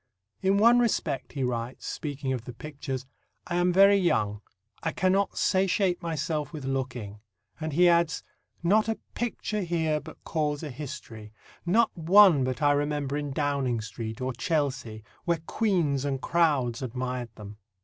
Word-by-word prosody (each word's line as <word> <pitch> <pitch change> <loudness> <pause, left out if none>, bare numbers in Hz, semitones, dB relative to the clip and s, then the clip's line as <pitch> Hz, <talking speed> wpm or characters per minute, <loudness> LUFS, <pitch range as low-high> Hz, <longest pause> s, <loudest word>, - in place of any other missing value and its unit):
"In 195 +1 +3
one 235 +3 +6
respect," 175 - -1
he 135 - -2
writes, 120 0 -3
speaking 140 -3 -3
of 120 -2 -4
the 125 - -7
pictures, 135 -1 -6 0.4
"I 175 - -2
am 175 0 +3
very 195 +2 +6
young; 105 - +1 0.4
I 165 - -2
cannot 190 +2 +1
satiate 185 -1 +2
myself 155 -2 -2
with 150 -5 -7
looking," 130 -6 -3 0.4
and 155 0 -3
he 175 +4 +5
adds, 170 -2 +2 0.4
"Not 215 +5 +3
a 225 - 0 0.2
picture 220 -3 -2
here 160 -4 0
but - - -13
calls 150 -1 -1
a 150 - -5
history; 120 -6 -8 0.4
not 225 +6 +3
one 175 -3 +6
but 130 +3 -2
I 145 - +5
remember 145 -1 0
in 145 -1 -2
Downing 140 -4 0
Street 110 +1 -6
or 130 0 -1
Chelsea, 130 -6 -2 0.2
where 170 -1 +2
queens 170 -12 +1
and 140 -2 -1
crowds 140 -7 +1
admired 125 -1 -3
them." 105 -1 -10
145 Hz, 155 wpm, -27 LUFS, 130-175 Hz, 0.4 s, one